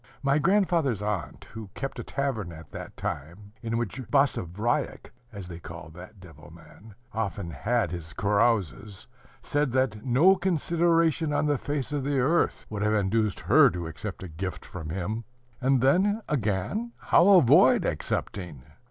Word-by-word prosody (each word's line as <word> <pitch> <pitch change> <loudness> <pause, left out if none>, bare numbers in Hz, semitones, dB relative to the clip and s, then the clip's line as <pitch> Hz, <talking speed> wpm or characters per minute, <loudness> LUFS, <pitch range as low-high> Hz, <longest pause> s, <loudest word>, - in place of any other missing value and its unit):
My 140 +2 +3
grandfather's 165 - +2
aunt, 105 -3 -4
who 110 -2 -8
kept 135 - -5
a - - -4
tavern 130 -10 -3
at 80 -1 -12
that - - -9
time, 85 +9 -6
in 115 -1 -2
which 120 +1 -3
Basavriuk 120 - 0 0.2
(as 100 -4 -8
they 85 -2 -8
called 80 -1 -10
that 90 +4 -12
devil 90 -3 -14
man) 110 0 -16 0.2
often 100 -5 -3
had 110 - 0
his 85 -2 -6
carouses, 100 - 0 0.4
said 145 -2 0
that 130 -5 0
no 140 +10 +5
consideration 165 -3 +1
on 145 +1 +1
the 145 -3 +1
face 145 -1 -3
of 145 -2 -2
the 140 0 0
earth 155 +7 +1
would 105 -1 -5
have 105 +1 +2
induced 105 +1 0
her - - +6
to 85 -1 -5
accept 90 +5 -7
a - - -6
gift 90 +2 -6
from 80 -4 -8
him. 95 +7 -3 0.4
And 135 -1 +3
then, 195 - +2
again, 140 - -2
how 170 - +4
avoid 180 - +6
accepting? 80 -1 -3
110 Hz, 155 wpm, -27 LUFS, 95-145 Hz, 0.4 s, her